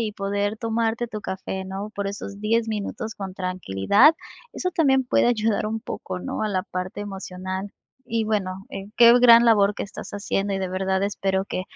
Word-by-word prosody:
y 215 -2 -2
poder 205 +1 -2
tomarte 230 +1 -1
tu 215 -2 -6
café, 190 0 -5
¿no?, 195 +2 -5
por 200 0 -3
esos 200 0 -6
10 225 +2 +1
minutos 220 +1 -4
con 190 -2 -7
tranquilidad. 185 - +3 0.4
Eso 365 - -2
también 275 -7 +3
puede 245 - +2
ayudar 220 -3 +1
un 220 +1 -3
poco, 185 -3 -6
¿no?, - - -4
a 215 - 0
la 185 -2 -1
parte 185 +2 -5
emocional 190 -1 -5 0.3
y 230 -2 -1
bueno, 195 -3 -2 0.3
qué 235 0 +8
gran 235 -1 +8
labor 205 -3 +4
que - - -3
estás 195 - -9
haciendo 200 0 -2
y 195 - -1
de 190 -1 -2
verdad 190 +1 0
espero 195 -1 -1
que 185 - -3
205 Hz, 185 wpm, -24 LUFS, 190-225 Hz, 0.4 s, qué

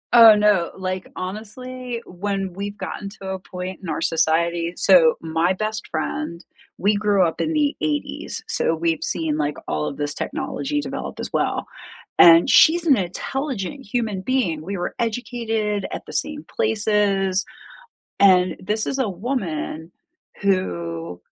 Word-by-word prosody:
Oh, 225 -2 +10
no, 210 -5 +3
like, 185 0 -3
honestly, 235 +6 -6
when 195 0 -3
we've 200 +2 -5
gotten 200 - -5
to 190 - -5
a 190 0 -3
point 185 0 -7
in 185 - -7
our 155 - -2
society 170 +1 +1
so, 175 -5 +6
my 165 +3 +1
best 215 +2 -3
friend 160 +2 -3 0.4
we 205 +2 +3
grew 205 -2 +3
up 165 - -2
in 315 - 0
the 295 -1 +1
'80s, 295 -1 -3
so, 165 - +1
we've 165 -1 -1
seen, 160 -3 -1
like, 150 -1 -1
all 75 0 -1
of - - -5
this 145 0 -2
technology 295 - -3
develop - - -6
as - - -5
well. - - 0 0.5
And 165 0 +8
she's 335 +2 +6
an 285 -5 +6
intelligent 260 - -3
human 220 -6 -1
being, 190 -10 0
we 195 +5 -4
were 175 - -3
educated 225 -3 -2
at - - -5
the - - -10
same 300 0 -2
places 205 - +1 0.8
and 185 -3 +5
this 210 +3 -1
is 275 - -2
a 260 - +1
woman 180 - -4 0.5
who 90 - -1
195 Hz, 150 wpm, -22 LUFS, 170-225 Hz, 0.8 s, Oh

